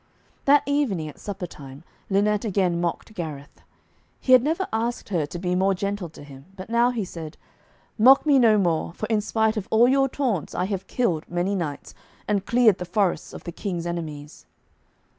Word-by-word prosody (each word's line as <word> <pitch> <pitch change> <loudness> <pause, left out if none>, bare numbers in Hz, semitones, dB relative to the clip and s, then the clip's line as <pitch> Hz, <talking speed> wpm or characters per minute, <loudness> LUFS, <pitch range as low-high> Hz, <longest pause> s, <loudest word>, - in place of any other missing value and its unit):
That 285 +1 +5
evening 250 - 0
at 150 - -14
supper 195 -3 -5
time, 140 -3 -12 0.3
Lynette 205 +1 +2
again 185 -5 0
mocked 175 +5 -3
Gareth. 150 -6 -7 0.6
He 255 - +3
had 255 - +8
never 325 +8 -1
asked 230 +1 -2
her 165 -7 0
to 175 - -7
be 180 0 -2
more 190 +1 +2
gentle 200 -2 -3
to 150 - -13
him, 135 -1 -13
but 190 +3 -9
now 235 +1 +4
he 235 -5 -2
said, 165 -3 -8 0.6
'Mock 265 +7 +7
me 285 -3 +5
no 225 -3 +5
more, 170 -4 0
for 215 - -4
in 215 -1 +2
spite 220 +1 0
of 195 - -4
all 230 +2 +5
your 270 +1 +3
taunts 240 - -2
I 180 - 0
have 190 -1 -4
killed 175 -11 -1
many 175 +3 -1
knights, 165 -7 -4 0.3
and 200 -2 -1
cleared 235 -5 +4
the 180 - -4
forests 180 0 0
of - - -10
the 170 - -6
King's 175 -2 -4
enemies.' 155 -4 -6
195 Hz, 190 wpm, -24 LUFS, 170-230 Hz, 0.6 s, had